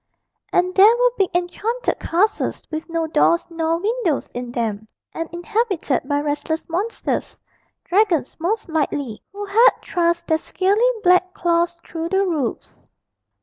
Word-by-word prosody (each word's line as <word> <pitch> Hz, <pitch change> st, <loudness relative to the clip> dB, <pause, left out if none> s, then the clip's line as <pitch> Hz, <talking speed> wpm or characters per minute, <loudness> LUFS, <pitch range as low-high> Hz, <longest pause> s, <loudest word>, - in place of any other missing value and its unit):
And 365 Hz, +1 st, +2 dB
there 410 Hz, +5 st, +7 dB
were -, -, +3 dB
big 390 Hz, -5 st, +1 dB
enchanted 420 Hz, +7 st, -1 dB
castles 405 Hz, +6 st, 0 dB
with 315 Hz, +2 st, -5 dB
no 330 Hz, -1 st, -1 dB
doors 320 Hz, +2 st, +2 dB
nor 330 Hz, 0 st, 0 dB
windows 405 Hz, -, -1 dB
in 245 Hz, 0 st, -5 dB
them, 220 Hz, -3 st, -3 dB, 0.3 s
and 330 Hz, 0 st, -4 dB
inhabited 380 Hz, -, -1 dB
by 285 Hz, 0 st, +1 dB
restless 300 Hz, +2 st, -2 dB
monsters 385 Hz, +8 st, -3 dB, 0.4 s
dragons 360 Hz, -, +1 dB
most 425 Hz, +7 st, -1 dB
likely 285 Hz, -7 st, -2 dB
who 405 Hz, +1 st, -6 dB
had 440 Hz, +5 st, +6 dB, 0.2 s
thrust 340 Hz, -1 st, 0 dB
their 320 Hz, 0 st, +1 dB
scaly 405 Hz, +9 st, +1 dB
black 365 Hz, 0 st, +3 dB
claws 340 Hz, 0 st, +1 dB
through 330 Hz, 0 st, -4 dB
the 385 Hz, +1 st, +2 dB
roofs. 305 Hz, -10 st, -4 dB
345 Hz, 140 wpm, -21 LUFS, 320-400 Hz, 0.4 s, there